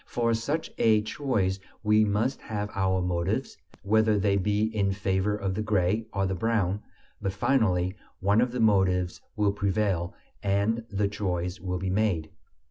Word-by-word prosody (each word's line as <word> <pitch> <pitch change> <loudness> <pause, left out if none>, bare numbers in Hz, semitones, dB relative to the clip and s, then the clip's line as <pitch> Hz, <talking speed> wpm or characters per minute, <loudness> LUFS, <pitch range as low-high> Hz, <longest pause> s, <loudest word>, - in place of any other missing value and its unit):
For 115 -1 0
such 140 +8 -2
a 110 -2 +4
choice 110 -6 -1 0.2
we 105 0 +4
must 110 +6 0
have 105 -1 -4
our 95 -1 +1
motives, 90 +8 -1 0.3
whether 110 +1 +3
they 100 0 +2
be 105 +2 +1
in 100 -2 +1
favor 95 +1 0
of 100 -2 -2
the 105 - -2
gray 105 +1 +1
or 95 -1 0
the 95 - -1
brown; 105 -1 0 0.4
but 95 -2 -1
finally 95 -5 +2 0.3
one 100 +4 +3
of 125 0 +1
the 125 - -3
motives 95 -5 +2
will 105 -2 +2
prevail 100 -3 -1 0.3
and 100 +4 +1
the 100 0 0
choice 90 -3 -2
will 90 +1 -3
be 95 +1 -2
made. 95 -6 0
100 Hz, 160 wpm, -27 LUFS, 95-110 Hz, 0.4 s, a